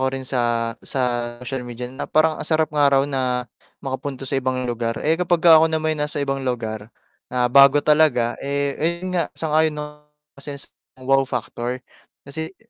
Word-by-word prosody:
ko 130 - +1
rin 135 0 -5
sa, 120 -3 -1
sa 135 - -5 0.4
social 130 +2 -4
media 120 +1 -6
na 130 - -6
parang 155 0 +2
ang - - -7
sarap 155 -1 +1
nga 145 -1 +4
raw 135 0 +3
na 130 -3 -1 0.4
makapunta 135 0 -4
sa 135 +1 -1
ibang 130 0 -1
lugar. 115 -1 -2
Eh, 160 +3 +1
kapag 175 -1 +1
ka 165 -2 +9
ako 160 - +4
na 160 - 0
may 155 0 0
nasa 150 -1 -4
ibang 135 0 -2
lugar 110 -4 -4 0.4
na, 125 0 0
bago 140 +1 +7
talaga, 150 -6 +3
eh 140 0 -1
ayun 170 +3 -2
nga 175 -2 0
sang-ayon 155 0 +1
na 150 - -4 0.6
isa 140 0 -7
yan - - -15
sa - - -28 0.4
wow 135 +1 +4
factor 125 0 -4 0.4
kasi 160 +6 -7
140 Hz, 190 wpm, -22 LUFS, 125-155 Hz, 0.6 s, ka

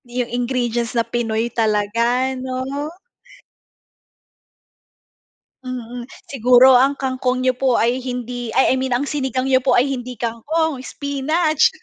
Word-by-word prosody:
'Yung 245 -1 -3
ingredients 240 -1 -1
na 230 - +2
Pinoy 230 0 -2
talaga 230 +4 +1
'no? 260 +3 -4 2.7
Mm, 245 -1 -7 0.2
siguro 255 0 +5
ang 270 +3 +4
kangkong 255 -1 -1
niyo 255 - +3
po 255 -1 +1
ay 240 +3 +1
hindi 245 -1 -5
ay 265 - +4
I - - +1
mean 255 -2 0
ang 280 - -2
sinigang 265 -3 -2
niyo 260 -1 +3
po 260 - +3
ay 245 - +4
hindi 250 -3 -5
kangkong, 265 +6 -2
spinach. 295 +4 +1
255 Hz, 125 wpm, -20 LUFS, 240-265 Hz, 2.7 s, siguro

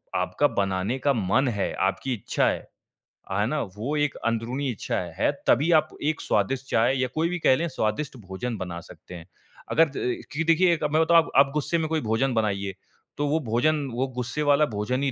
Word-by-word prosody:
आपका 90 - +1
बनाने 100 +1 -1
का 140 +1 +2
मन 120 +4 +1
है, 100 -5 -1
आपकी 95 +7 -1
इच्छा 110 - 0
है। - - -4 0.6
है 100 +2 +1
ना? 150 +2 -1
वो 110 +9 -4
एक 145 -1 0
अंदरूनी 115 +4 -1
इच्छा 105 - -4
है। - - -6
है, - - +3 0.2
तभी 150 +8 +4
आप 155 -2 +4
एक 155 +2 0
स्वादिष्ट 125 +6 0
चाय 115 +4 +3
या 130 - +1
कोई 160 +2 +1
भी 180 0 -3
कह 130 - +4
लें 170 +5 -1
स्वादिष्ट 130 0 -2
भोजन 110 +5 -4
बना 90 -3 -5
सकते 90 - -13
हैं। 85 -2 -10 0.5
अगर 165 0 +4
द 125 -3 -3
कि 160 +3 -1
देखिए 170 +1 +4
अब 150 - 0
मैं 155 - +4
बताऊँ 170 +1 +5
आप 165 - 0
आप 140 0 +6
गुस्से 150 +3 0
में 160 -1 -1
कोई 160 -1 0
भोजन 115 +4 0
बनाइए। 100 -3 -1 0.4
तो 145 - 0
वो 155 +3 +1
भोजन, 145 +4 +1
वो 130 +3 -1
गुस्से 125 +4 -3
वाला 145 +1 +4
भोजन 120 +2 -2
ही 140 - +1
130 Hz, 210 wpm, -25 LUFS, 110-150 Hz, 0.6 s, आप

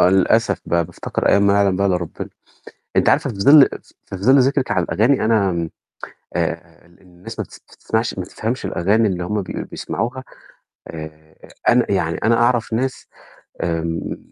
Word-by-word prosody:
آه - - +6
للأسف 95 -1 +2
بقى، 85 0 +1
بافتكر - - -3
أيام 100 0 +4
ما 100 - +4
يعلم 100 -2 +2
بيها 100 +1 +1
إلّا 90 -2 +2
ربنا، 85 -2 -6 0.7
أنتِ - - +3
عارفة - - +2
في 105 - -8
ظل 140 +6 +8 0.4
في 95 - -6
ظل 130 +9 +4
ذِكرِك 135 0 +1
على 95 -4 +1
الأغاني 115 +7 +2
أنا 110 -3 +2
آمم 85 -2 -3 0.7
آآ، 85 0 -4
ال 85 0 -24
الناس 90 -1 -12
ما - - -2
بتس - - -16
تسمعش 115 +1 -3
ما 95 - -2
بتفهمش 115 +6 -4
الأغاني 105 +5 +1
اللي 90 -2 -3
هُم 105 +3 -2
بيق 90 - -7
بيسمعوها 130 +3 -4 0.6
آآ، 80 -1 -10 0.3
أنا - - +3
يعني - - 0
أنا 115 - +4
أعرف 120 -1 +1
ناس 130 +3 -2 0.6
آمم، 85 -1 -2
100 Hz, 170 wpm, -20 LUFS, 85-115 Hz, 0.7 s, ظل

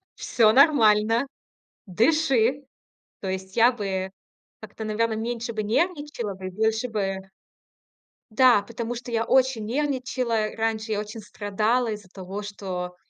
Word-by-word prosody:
Всё 225 -3 +3
нормально. 230 -3 +4 0.6
Дыши". 270 - +2 0.6
То 190 - -4
есть 190 +1 -5
я 235 +2 +6
бы 190 -4 -3 0.5
как-то, 215 +1 -8
наверное, 220 +1 0
меньше 230 +1 -3
бы 215 -1 -2
нервничала 290 - -1
бы, 185 0 -8
и - - -4
больше 220 +5 0
бы 195 -3 -3 1.0
Да, 240 -2 +5
потому 230 +2 -5
что 240 0 -7
я 225 0 0
очень 260 -4 +2
нервничала. 250 -4 -1
Раньше 220 0 -1
я 205 - -1
очень 210 +2 -8
страдала 215 +3 -1
из-за 210 -2 -7
того, 190 +2 -7
что 185 -3 -5
220 Hz, 135 wpm, -25 LUFS, 205-245 Hz, 1.0 s, я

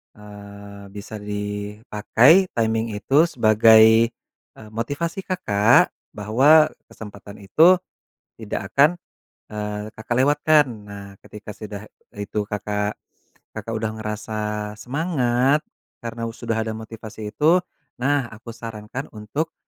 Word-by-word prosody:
Eee, 100 -1 -12
bisa 105 +1 -8
dipakai 105 - +2
timing 115 -1 0
itu 135 +10 +3
sebagai, 110 -3 +5 0.4
eee, 110 - -13
motivasi 145 - -4
Kakak 115 - +3 0.2
bahwa 135 +10 +4 0.2
kesempatan 100 -1 -12
itu 165 - +5 0.6
tidak 100 -2 -5
akan, 140 +2 +6 0.6
eee, 105 0 -5
Kakak 115 +2 -3
lewatkan 145 +3 +4 0.2
nah 100 -1 -9
ketika 105 0 -11
sudah 105 -1 -8 0.3
itu 105 0 -4
Kakak 105 0 -3 0.6
Kakak 115 - -6
udah 110 0 -2
ngerasa 105 0 -4
semangat 135 -1 +1 0.4
karena 115 0 -5
u 115 - -5
sudah 115 -1 -3
ada 110 - -3
motivasi 110 -1 -8
itu, 165 +8 +3 0.4
nah 140 0 +1
aku 110 +2 -12
sarankan 115 +3 -7
untuk 115 +10 -4
110 Hz, 110 wpm, -22 LUFS, 105-130 Hz, 0.6 s, akan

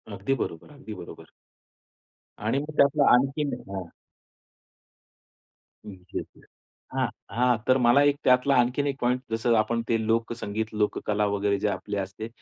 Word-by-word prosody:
अगदी 135 +6 -1
बरोबर, 85 - -5
अगदी 140 -6 -9
बरोबर. 85 - -11 1.2
आणि 115 +5 +1
मग 150 +1 -6
त्यातला 140 +1 +4
आणखीन 140 +3 +2 0.2
हां. 95 -3 -5 2.0
हं, - - -7 0.2
येस, - - -3
येस. - - -20 0.5
हां, - - +1 0.3
हां, 125 0 +3
तर 130 - +5
मला 125 +2 +5
एक 140 - 0
त्यातला 125 +2 +4
आणखीन 125 +4 +2
एक 140 - -1
पॉइंट 125 +1 +1
जसं 115 +1 +2
आपण 115 +2 +1
ते 115 - +2
लोकसंगीत 115 -1 -1
लोककला 105 0 0
वगैरे 100 0 0
जे - - 0
आपले 100 +1 -3
असते. 95 +3 -5
115 Hz, 145 wpm, -26 LUFS, 105-135 Hz, 2.0 s, तर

